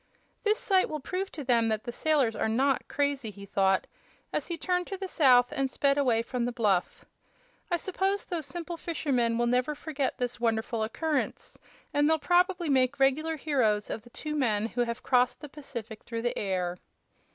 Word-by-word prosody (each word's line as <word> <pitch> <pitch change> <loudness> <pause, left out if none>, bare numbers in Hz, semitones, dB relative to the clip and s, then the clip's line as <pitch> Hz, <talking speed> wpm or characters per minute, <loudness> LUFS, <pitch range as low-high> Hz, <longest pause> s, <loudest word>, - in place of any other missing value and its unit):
"This 430 0 +3
sight 380 -2 +2
will 305 - -3
prove 370 +7 -3
to 300 - -6
them 235 -3 +3
that 220 -1 -1
the 240 - -4
sailors 275 -3 +1
are - - 0
not 265 +4 +1
crazy," 280 -5 -1
he 200 -1 -10
thought, 190 -1 +2 0.5
as - - -1
he 340 - -3
turned 360 0 -1
to 390 - -4
the 385 0 -4
south 250 -8 +5
and 270 -1 0
sped 275 +2 +2
away 245 -5 +2
from 245 0 -2
the 245 - -1
bluff. 205 -7 0 0.6
"I 345 - +2
suppose 385 +3 -1
those 330 -6 -4
simple 340 +4 -5
fishermen 260 -9 0
will 240 - +2
never 250 +5 +1
forget 290 -3 -3
this 245 -1 -2
wonderful 225 -1 0
occurrence, 300 +8 -2 0.3
and 290 +1 +3
they'll 320 - +4
probably 355 +2 +2
make 265 -1 +2
reg'lar 305 +4 +2
heroes 250 -9 +1
of - - -4
the 240 - -17
two 300 +5 -5
men 225 -8 +1
who 245 +1 0
have 235 -1 -5
crossed 250 0 +2
the 295 - -8
Pacific 235 -7 -8
through 230 -1 -5
the 240 - 0
air." 180 -3 -2
265 Hz, 190 wpm, -29 LUFS, 230-315 Hz, 0.6 s, south